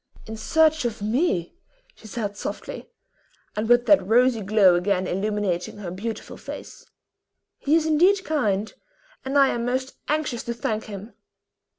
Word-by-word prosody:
"In 220 - -7
search 315 +6 +2
of 225 -3 -3
me!" 215 - 0 0.4
she 225 - -15
said 205 -1 -4
softly, - - -6 0.7
and 215 +2 -2
with 240 0 +5
that 295 -9 +5
rosy 235 +3 +3
glow 200 -2 +5
again 185 +1 +1
illumining 195 -1 -2
her 190 -4 -6
beautiful 215 +5 -6
face; - - -9 0.7
"he 295 +3 +2
is 325 -1 +2
indeed 360 +5 +3
kind, 215 -9 0 0.5
and 270 +2 -1
I 275 -1 +6
am 235 - -2
most 255 +2 -2
anxious 295 -6 -1
to 235 - -3
thank 220 -2 -2
him." 205 +2 -9
225 Hz, 150 wpm, -24 LUFS, 205-275 Hz, 0.7 s, I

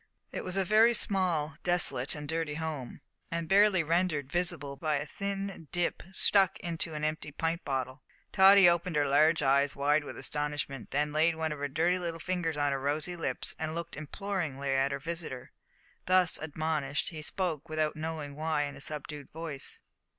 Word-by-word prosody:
It - - -4
was 185 +1 -2
a 195 - +2
very 225 +5 +5
small, 175 -8 +1
desolate, 175 -6 +2
and 150 -1 -6
dirty 160 -1 -2
home, 155 -5 -5 0.3
and 165 -1 -3
barely 195 -1 +5
rendered 160 -4 0
visible 165 -6 -1
by 155 +2 -1
a 145 - -3
thin 195 -1 -4
"dip" 175 -1 -1
stuck 195 0 +3
into 165 -2 -3
an 150 - -4
empty 155 0 -2
pint 165 +3 -2
bottle. 130 0 -3 0.3
Tottie 195 -1 +8
opened 170 -1 +2
her 145 -1 +3
large 155 +3 +4
eyes 140 +1 +3
wide 145 +2 +2
with - - -8
astonishment, 145 -4 -3
then 150 +2 0
laid 160 +2 +3
one 160 -1 -2
of 150 - -5
her 145 - -1
dirty 165 +6 +1
little 170 -2 -4
fingers 170 -3 -2
on 145 -1 +1
her 135 - -1
rosy 150 +5 -2
lips 165 - -2
and 160 0 -2
looked 170 0 -5
imploringly 155 -4 -3
at 135 +1 +2
her 140 - -1
visitor. 155 -4 -6 0.6
Thus 185 -1 +4
admonished, 155 -2 -2
he 155 -2 -7
spoke, 165 -1 -2
without 155 -1 0
knowing 155 -2 -5
why 155 -1 0
in 145 -1 -5
a 135 - -9
subdued 150 -1 -5
voice. 160 -4 -5
155 Hz, 180 wpm, -30 LUFS, 145-175 Hz, 0.6 s, Tottie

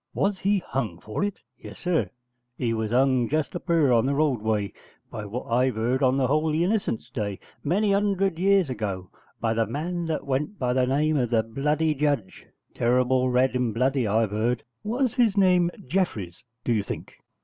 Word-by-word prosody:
'Was 200 -1 0
he 200 +2 +2
hung 110 -11 -3
for 105 - -4
it?' 205 -10 -3 0.2
'Yes, 105 -2 -10
sir, 175 -2 0 0.5
he 115 -2 0
was 110 -1 -2
hung 125 0 +2
just 155 0 -1
up 175 - -6
yurr 155 -7 +4
on 115 +2 +3
the 140 - +1
roadway, 110 -9 0 0.4
by 105 - -5
what 120 +5 -5
I've 125 0 +1
'eard, 125 +4 0
on 130 0 +3
the 135 - +2
Holy 155 +4 +1
Innocents' 195 - -1
Day, 100 -2 -3 0.3
many 200 +6 +2
'undred 195 -3 +1
years 195 -5 +3
ago, 100 -6 -4 0.3
by 115 -1 0
the 115 -1 +1
man 170 - -3
that 160 -3 -2
went 140 +9 -2
by 125 -1 0
the 125 0 +2
name 150 +3 +2
of 125 -3 +1
the 115 -2 +2
bloody 150 +7 0
judge: 140 -9 -2 0.3
terrible 125 +1 +2
red 125 +1 +2
and 125 -3 0
bloody, 130 0 +1
I've 110 0 +1
'eard.' 115 +3 0 0.2
'Was 245 +2 0
his 225 -5 +2
name 180 -3 +4 0.2
Jeffreys, 120 - -2 0.2
do 120 - +1
you 110 - +2
think?' 100 - -7
130 Hz, 185 wpm, -25 LUFS, 115-165 Hz, 0.5 s, yurr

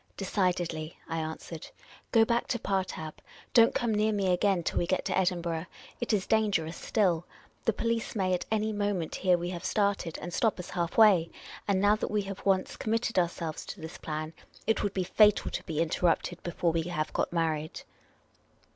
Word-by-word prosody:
" - - -42
Decidedly," 175 -5 -1
I 165 0 -2
answered. 160 0 -6 0.2
" - - -23
Go 225 -1 +6
back 235 +1 0
to 240 - 0
Partab. 185 -7 -2 0.4
Don't 230 -1 +6
come 235 -2 +1
near 215 +1 +2
me 195 -3 +1
again 185 -1 +2
till - - 0
w^e 170 - 0
get 185 - 0
to - - 0
Edinburgh. 175 -2 0 0.3
It 240 - -1
is 205 -3 +1
danger 215 -7 +2
ous 165 +2 -6
still. 180 -6 +1 0.4
The 225 - +3
police 230 +1 -1
maj'^ 185 -3 +1
at 180 - -1
any 220 0 0
moment 205 -5 -1
hear 180 -2 +3
we 175 +1 -3
have 175 0 -6
started 200 -6 0
and 175 - -6
stop 225 +3 +2
us 180 - -7
half 170 -1 -2
way; 195 -7 +6 0.4
and 200 -2 +2
now 205 +2 +5
that - - -3
we 210 -1 0
have 195 0 -7
once 190 -1 +1
committed 225 -2 0
ourselves 170 -2 -2
to 195 - -7
this 160 +1 -8
plan 155 0 -4 0.3
it 220 - +2
would 200 - -2
be 190 - +1
fatal 210 +3 +4
to - - -4
be 160 -2 -3
inter 165 +2 +1
rupted 175 +1 0
before 175 0 0
we 165 0 0
have 160 -2 -3
got - - 0
married." 160 -2 -1
185 Hz, 200 wpm, -29 LUFS, 165-210 Hz, 0.4 s, Go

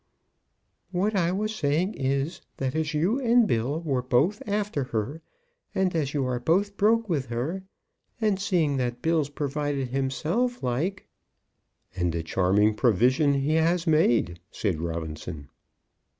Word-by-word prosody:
"What 195 +4 0
I 175 -3 +2
was 215 +3 -1
saying 165 +4 0
is, 135 +4 -1 0.2
that 130 -1 -2
as 155 -1 -1
you 185 - +1
and 240 -2 +4
Bill 130 - 0
were 135 -6 0
both 135 +11 +1
after 205 -9 -1
her, 125 +7 -3 0.5
and 185 -2 +1
as 145 -4 0
you 140 -2 +1
are 125 -1 -1
both 190 +10 +1
broke 225 +2 +3
with 145 -8 -1
her, 130 +11 -3 0.6
and 210 -4 +1
seeing 175 -8 +1
that 120 -1 -2
Bill's 160 -3 +1
provided 145 -2 -2
himself 160 - -1
like 160 +11 -1 0.5
" - - -41
"And 90 -2 0
a 85 - -2
charming 95 +5 +2
provision 125 - +3
he 140 +3 +1
has 165 +2 +2
made," 120 - +2
said 90 -9 -2
Robinson. 80 -2 -5
145 Hz, 145 wpm, -26 LUFS, 125-185 Hz, 0.6 s, and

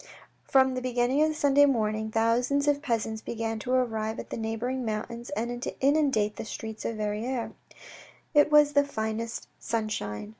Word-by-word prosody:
From 265 -1 +4
the 255 - -3
beginning 250 +2 +1
of 310 - +5
the 310 - -2
Sunday 285 -1 +5
morning, 220 -4 0
thousands 240 +6 +1
of 290 -1 +2
peasants 225 -5 -2
began 225 -1 -3
to 250 - -4
arrive 220 -4 0
from - - -5
the - - -3
neighbouring 230 +3 -2
mountains, 235 +2 -4
and 240 +2 -3
to - - -5
inundate 270 -7 +2
the - - -4
streets 220 0 -7
of 230 - -2
Verrieres. 220 +4 -2 0.8
It 295 0 +5
was 295 -1 +6
the 285 0 +5
finest 225 -3 -4
sun 225 -2 -2
shine. 105 - -4
235 Hz, 175 wpm, -28 LUFS, 220-270 Hz, 0.8 s, was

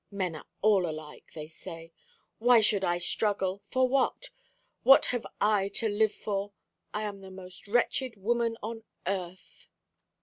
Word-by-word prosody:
Men 185 -5 -2
are 155 - -10 0.2
all 200 -5 +4
alike, 155 -1 -9
they 155 -1 -6
say. 165 +1 -10 0.5
Why 240 +1 +6
should 205 -2 +2
I 175 -1 +2
struggle? 195 +1 0
For 260 0 +3
what? 275 - 0 0.5
What 270 - +7
have 245 -2 -2
I 205 -2 +3
to 230 - +1
live 215 +1 +2
for? 200 -1 -3 0.4
I 210 - -3
am 200 -2 -5
the 190 - -10
most 185 0 -11
wretched 245 +2 +1
woman 230 +3 0
on 225 +1 -5 0.2
earth." 185 -1 -5
200 Hz, 155 wpm, -29 LUFS, 185-225 Hz, 0.5 s, What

